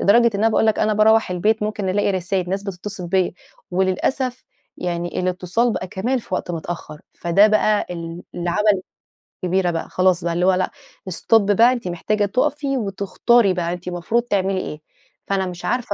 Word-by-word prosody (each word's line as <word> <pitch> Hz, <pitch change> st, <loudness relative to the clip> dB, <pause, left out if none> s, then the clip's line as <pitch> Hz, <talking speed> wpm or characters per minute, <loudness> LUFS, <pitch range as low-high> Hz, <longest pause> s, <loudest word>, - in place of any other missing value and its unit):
لدرجة 235 Hz, +4 st, +5 dB
إن -, -, -1 dB
أنا 225 Hz, -, +4 dB
باقول 220 Hz, -, +2 dB
لك 220 Hz, -, +2 dB
أنا 215 Hz, -, +2 dB
باروّح 220 Hz, -1 st, +4 dB
البيت 210 Hz, +5 st, +1 dB
ممكن 210 Hz, -2 st, -2 dB
الاقي 205 Hz, +2 st, +1 dB
رسايل 185 Hz, -1 st, -1 dB
ناس 195 Hz, +1 st, -1 dB
بتتصل 195 Hz, -1 st, -6 dB
بيَّ، 185 Hz, -1 st, +1 dB, 0.4 s
وللأسف 190 Hz, +8 st, -1 dB, 0.3 s
يعني 175 Hz, 0 st, -3 dB
الاتصال 185 Hz, +6 st, 0 dB
بقى 185 Hz, -, -3 dB
كمان 240 Hz, +9 st, -1 dB
في 235 Hz, 0 st, -5 dB
وقت -, -, -3 dB
متأخّر، 160 Hz, -2 st, -6 dB
فده 175 Hz, +5 st, +4 dB
بقى 215 Hz, 0 st, +2 dB
ال 170 Hz, 0 st, -6 dB
اللي 175 Hz, 0 st, -2 dB
عمل 205 Hz, 0 st, +2 dB, 0.6 s
كبيرة 180 Hz, 0 st, +1 dB
بقى 165 Hz, -1 st, -4 dB
خلاص 185 Hz, -1 st, +2 dB
بقى 170 Hz, -, -1 dB
اللي 175 Hz, +1 st, +1 dB
هو 190 Hz, -, +5 dB
لأ، 185 Hz, 0 st, 0 dB, 0.4 s
stop 225 Hz, +6 st, +3 dB
بقى 230 Hz, +5 st, +6 dB
أنتِ 235 Hz, -7 st, -5 dB
محتاجة 205 Hz, +4 st, 0 dB
تقفي 275 Hz, +6 st, 0 dB
وتختاري 200 Hz, +1 st, +2 dB
بقى 175 Hz, -1 st, -2 dB
أنتِ 180 Hz, 0 st, -6 dB
مفروض 180 Hz, +7 st, 0 dB
تعملي 195 Hz, -4 st, 0 dB
إيه؟ 150 Hz, 0 st, -7 dB, 0.5 s
فأنا 195 Hz, -1 st, 0 dB
مش 180 Hz, -1 st, -7 dB
عارفة 245 Hz, -4 st, -1 dB
190 Hz, 180 wpm, -21 LUFS, 180-215 Hz, 0.6 s, بقى